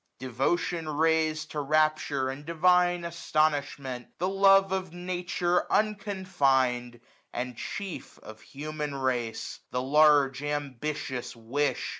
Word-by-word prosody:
Devotion 155 +6 -1
rais'd 155 0 +1
To 150 - -3
rapture, 150 -2 +1
and 135 +2 -6
divine 175 +2 +3
astonishment; 145 -6 -1
The 180 - 0
love 195 0 +5
of 190 -2 -2
Nature 175 0 -1
unconfin'd, 145 - +1 0.3
and, 125 0 -4
chief. 195 - -6
Of 110 0 -12
human 150 0 -5
ra'ce; 125 -4 -2
the 125 0 -2
large 145 -1 +4
ambitious 145 -2 -4
wish. 125 +6 -1
150 Hz, 105 wpm, -28 LUFS, 135-175 Hz, 0.3 s, love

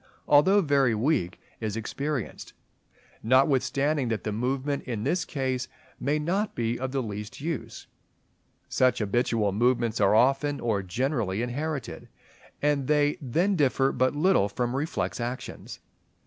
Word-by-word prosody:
although 190 +8 +5
very 140 - +2
weak, 110 - 0 0.2
is 110 -1 -3
experienced; 135 +2 -4 0.7
notwithstanding 135 +3 +2
that 110 -2 -2
the 105 - -2
movement 130 +6 -1
in 115 -5 -3
this 175 +5 0
case 130 -3 -2 0.3
may 145 +3 0
not 190 +8 -1
be 115 0 -1
of 130 0 -3
the 135 -1 -1
least 105 -1 -6
use. 155 -2 -5 0.8
Such 130 -1 +2
habitual 110 -1 +1
movements 120 +1 +1
are 100 +1 +4
often, 135 +4 +3
or 110 -4 0
generally 110 +1 -1
inherited; 145 +3 -4 0.5
and 145 -3 +1
they 150 -1 +2
then 170 +10 +1
differ 135 -3 +2
but 130 +3 +1
little 155 - +3
from 120 +4 -2
reflex 145 -1 -2
actions. 120 +2 -6
130 Hz, 135 wpm, -27 LUFS, 115-145 Hz, 0.8 s, although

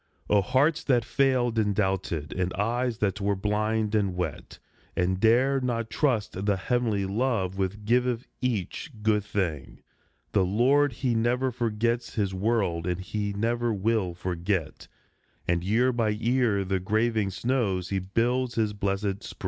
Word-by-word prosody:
O 105 -1 +5
hearts 150 - +2
that 120 -5 +2
failed 125 -4 +2
and 105 -2 +1
doubted, 95 -6 -1
and 90 0 -1
eyes 120 +4 0
that 100 -1 -1
were 100 0 +1
blind 105 +2 0
and 100 -4 +1
wet, 90 0 -4 0.4
And 95 +1 0
dared 130 +5 +3
not 115 -3 -2
trust 110 -8 0
the 100 -2 +2
heavenly 110 -1 0
love 100 -2 0
which 100 +2 -2
giveth 125 +1 +1 0.2
each 120 - -2
good 105 -1 +2
thing, 90 -8 -3 0.5
The 100 - +3
Lord 130 +9 +3
he 125 0 -1
never 125 +3 +1
forgets 115 0 -1
his 100 -3 0
world, 95 -4 0
and 90 0 -1
he 100 +2 -3
never 115 +3 0
will 105 -3 0
forget, 90 -1 -3 0.6
And 85 0 +1
year 115 +7 +2
by 115 -2 +1
year 115 -1 +1
from 95 - -5
the 95 -1 +1
graving 110 +2 +1
snows 100 -4 -1
he 95 - 0
builds 120 +6 0
his 110 -2 +1
blessed 100 0 -2
spring - - -10
105 Hz, 155 wpm, -27 LUFS, 95-120 Hz, 0.6 s, O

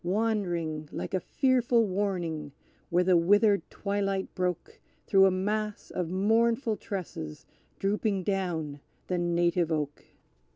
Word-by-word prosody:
Wandering, 175 -6 -1
like - - -5
a 185 - +2
fearful 245 - +2
warning, 175 -7 -2 0.4
where 175 +1 +3
the 180 0 +4
withered 205 +4 +4
twilight 195 -1 -2
broke 180 -2 -3 0.2
Through 195 -1 +6
a - - +5
mass 210 +3 -2
of 180 -3 -2
mournful 225 +5 +2
tresses, 160 - -6 0.3
drooping 200 -1 0
down 170 -7 -2 0.3
the 180 -1 -1
Native 175 -1 +1
Oak. 150 -2 -2
190 Hz, 120 wpm, -29 LUFS, 170-205 Hz, 0.4 s, Through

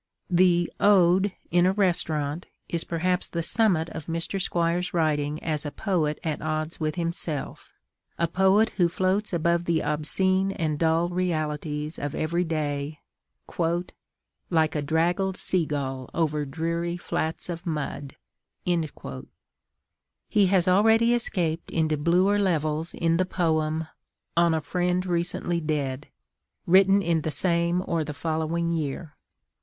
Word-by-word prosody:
The 175 -1 +3
Ode: 190 -1 +4 0.2
In 175 +1 +4
a 190 - +2
Restaurant 165 -5 0 0.2
is 170 -1 -1
perhaps 180 +2 -1
the 170 -1 -3
summit 180 -5 +4
of 160 -2 -7
Mr. 165 +4 -2
Squire's 175 +1 0
writing 150 -2 +1
as 155 -3 -2
a 150 - -3
poet 155 -4 -1
at 155 -3 -2
odds 155 +1 -3
with 155 -1 -1
himself, 170 -4 -4 0.5
a 170 - +1
poet 190 +5 +3
who 175 -3 +3
floats 185 +4 0
above 170 0 +1
the 165 -2 +1
obscene 190 +6 +1
and 155 -5 -2
dull 165 +1 +2
realities 155 -3 -2
of 145 0 -4
every 170 +3 0
day, 150 -2 -3 1.5
"like 160 -2 +2
a 150 - -1
draggled 175 +5 0
seagull 140 -7 -1
over 150 -3 0
dreary 170 +4 -2
flats 160 -2 -3
of 175 +1 -6
mud." 145 -3 -4 0.5
He 160 - -4
has 185 -2 +2
already 225 +5 +4
escaped 170 -8 -1
into 160 -2 +1
bluer 180 +7 +2
levels 160 -4 0
in 165 0 +1
the 185 - +2
poem, 160 -3 0 0.5
On 170 -1 +4
a 160 - -1
friend 180 +3 -1
Recently 175 -1 -1
Dead, 145 -3 -2 0.6
written 195 +2 +5
in 165 -2 +1
the 155 - -2
same 170 +3 +1
or 165 -2 0
the 150 -1 -6
following 160 +3 -1
year. 155 -1 -3
170 Hz, 130 wpm, -26 LUFS, 155-180 Hz, 1.5 s, written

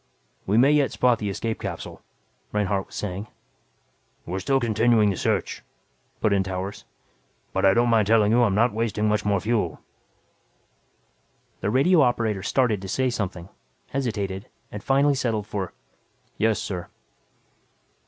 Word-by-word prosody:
"We 100 +3 +2
may 135 +5 +6
yet 145 -2 +3
spot 125 -2 +2
the 105 - -2
escape 110 +3 -3
capsule," - - -6 0.5
Reinhardt 100 -2 -1
was - - -13
saying. 100 +1 -4 1.0
"We're 90 +3 -3
still 135 +6 +1
continuing 115 -2 +3
the - - -3
search," - - -1 0.6
put 105 - +2
in 100 - +3
Towers. 95 +1 -5 0.7
"But - - +1
I 95 - +5
don't 120 +1 +3
mind 110 -3 +3
telling 110 -1 +4
you 120 +2 +4
I'm 100 -5 +2
not 115 +2 +3
wasting 110 -1 -1
much 105 0 0
more 100 -2 +2
fuel." 105 -6 -1 1.8
The - - -1
radio 150 - +4
operator 115 -6 +1
started 110 -1 +1
to 95 - -7
say 130 +6 0
something, 95 -5 -4 0.4
hesitated 105 -7 -3 0.2
and 105 -1 -7
finally 140 +2 +3
settled 115 -6 -1
for, 100 -3 -4 0.6
"yes, 110 0 +1
sir." 90 -3 -5
105 Hz, 145 wpm, -24 LUFS, 100-120 Hz, 1.8 s, may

